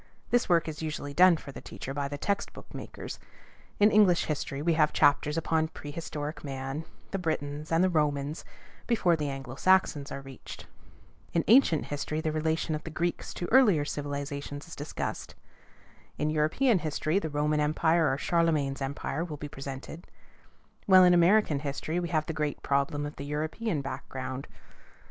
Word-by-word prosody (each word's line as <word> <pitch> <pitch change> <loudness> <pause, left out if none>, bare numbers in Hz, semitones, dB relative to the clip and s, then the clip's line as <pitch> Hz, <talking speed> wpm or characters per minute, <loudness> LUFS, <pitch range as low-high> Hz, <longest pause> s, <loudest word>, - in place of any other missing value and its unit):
This 245 -4 +2
work 170 -2 +3
is 155 -1 -5
usually 150 -2 -4
done 180 +1 +6
for 145 - -10
the - - -9
teacher 135 - -7
by 140 0 -2
the 145 +1 -5
text 200 +7 -2
book - - -13
makers. - - -7 0.6
In 210 +1 +6
English 200 -5 +5
history 140 -2 -3
we 165 +3 +2
have 155 -1 +3
chapters 150 +2 +3
upon 160 0 +1
pre 145 -2 -9
historic 150 -1 -5
man, 135 +2 -4 0.3
the 195 - -2
Britons, 150 -3 -3
and 165 +2 +4
the - - +5
Romans, 150 -3 0 0.4
before 185 -8 +3
the 150 -2 -2
Anglo 135 -2 -6
Saxons 150 -3 +2
are 135 - -5
reached; 135 -2 -10 0.7
in 165 - +2
ancient 220 - +5
history 145 +2 -3
the 160 -1 -1
relation 160 +1 0
of 155 - -3
the - - -6
Greeks 170 +2 -2
to 175 - -3
earlier 210 - +5
civilizations 145 0 -5
is 170 - -9
discussed; 145 +2 -5 0.8
in 150 +1 0
European 165 - +2
history, 155 +2 0
the 160 - -4
Roman 150 +1 +1
Empire 160 +2 +2
or 135 - 0
Charlemagne's 155 -5 +1
Empire 140 +3 -3
will 155 -4 -6
be 145 - -6
presented; 140 +4 -8 0.8
while 185 -1 +8
in 180 -1 +6
American 175 -3 +4
history 150 +4 -3
we 175 -1 -3
have 155 -2 +1
the 160 - -4
great 150 -1 -3
problem 140 +1 0
of 145 - -7
the 140 - -6
European 155 +5 -2
background. 130 -1 -5
155 Hz, 170 wpm, -29 LUFS, 145-170 Hz, 0.8 s, while